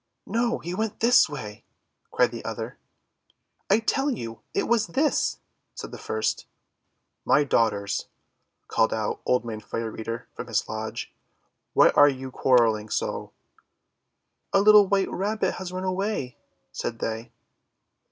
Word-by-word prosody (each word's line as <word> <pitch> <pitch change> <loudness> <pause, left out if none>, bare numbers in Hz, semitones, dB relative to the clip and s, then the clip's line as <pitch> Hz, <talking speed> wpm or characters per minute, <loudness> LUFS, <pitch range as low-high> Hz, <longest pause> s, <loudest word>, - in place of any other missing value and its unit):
"No, 235 +1 0
he 175 - -6
went 215 +2 -2
this 235 -6 +5
way!" 105 -8 -7 0.5
cried - - +2
the - - -7
other. - - -5 0.9
"I 200 - +6
tell 270 +5 0
you, 115 - -5
it - - -1
was 230 -2 +2
this!" 290 +3 +1 0.4
said - - -7
the - - -8
first. 445 0 -2 0.8
"My 150 - +4
Daughters," 105 -7 0 0.6
called 110 0 +2
out 110 -1 -2
Old 125 -1 +2
Man 110 -2 -5
Fire 115 +1 -5
Keeper 115 +2 -5
from - - -7
his 110 -3 0
lodge, 110 0 -5 0.6
;'why - - +6
are 145 0 +6
you 130 -1 -5
quar 130 0 +3
relling 110 -2 +2
so?' - - -2 1.2
"Our 195 - +5
little 210 -1 +7
white 195 -1 +1
Rabbit 210 +3 0
has 185 -1 -5
run 185 0 -4
away," 185 -8 -2 0.3
said 115 - -4
they. 115 +1 -4
145 Hz, 140 wpm, -26 LUFS, -, 1.2 s, little